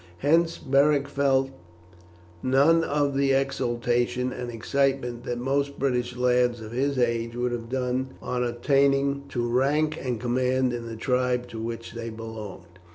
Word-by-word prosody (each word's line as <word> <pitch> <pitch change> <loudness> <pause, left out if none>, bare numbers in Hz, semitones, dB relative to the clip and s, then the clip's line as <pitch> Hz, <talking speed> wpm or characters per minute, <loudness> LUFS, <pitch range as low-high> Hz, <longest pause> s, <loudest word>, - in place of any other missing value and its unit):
Hence 165 - +2
Beric 140 +1 +2
felt 135 -1 +1 0.9
none 145 +6 +4
of 145 -2 0
the 135 0 +2
exultation 125 -2 0
and 125 - -5
excitement 125 +1 -1
that 120 - -2
most 140 +3 -1
British 125 -2 -1
lads 125 -1 +2
of 110 0 -9
his 135 +3 0
age 115 -1 0
would 125 0 -1
have 115 -1 -5
done 130 0 -2
on 125 -1 -2
attaining 140 +3 +1
to 120 -1 -1
rank 145 +6 +1
and 125 -4 -2
command 125 +1 +1
in 120 -1 -5
the 115 - -6
tribe 125 +1 0
to 115 -2 -7
which 115 0 -5
they 115 -1 -6
belonged. 105 -6 -9
125 Hz, 150 wpm, -26 LUFS, 120-140 Hz, 0.9 s, none